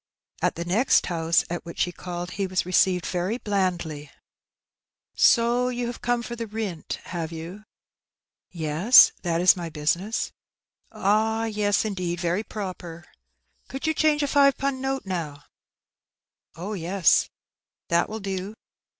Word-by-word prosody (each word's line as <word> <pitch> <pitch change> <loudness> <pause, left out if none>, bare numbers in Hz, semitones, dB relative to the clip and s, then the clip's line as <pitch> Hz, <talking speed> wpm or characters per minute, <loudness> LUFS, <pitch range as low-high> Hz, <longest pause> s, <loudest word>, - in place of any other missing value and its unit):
At - - +1
the 170 - -4
next 210 +10 +3
house 165 -1 +1
at 175 0 -4
which 170 - -2
he 180 - -2
called 175 0 -6
he 195 -1 -2
was 185 -2 -1
received 180 0 +2
very 185 +5 -2
blandly. 175 - -2 1.1
''So 240 +1 +4
you 245 -1 -3
have 240 0 -6
come 245 -1 0
for 240 - -6
the 230 -1 -5
rint, 205 -6 -4
have 170 -2 -5
you?^' 170 +6 -8 0.8
"Yes, 170 +8 +6
that 170 -2 -1
is 180 +1 +6
my 170 -2 -5
business.^^ 170 +8 -1 0.6
"Ah, 220 +3 +1
yes, 210 -1 0
indeed, 180 -4 -3
very 175 +3 0
proper. 180 -5 -7 0.6
Could 270 +3 -6
you 315 - +2
change 305 -1 +2
a - - +1
five 280 -1 +4
pun^ 275 -1 -1
note, 270 0 -2
npw?^' 165 -6 -4 1.1
"Oh, 185 +5 -6
yes/' 180 -1 +2 0.3
" - - -68
That 170 0 +2
will 220 +1 -5
do.'' 195 +1 -5
190 Hz, 145 wpm, -25 LUFS, 170-225 Hz, 1.1 s, Yes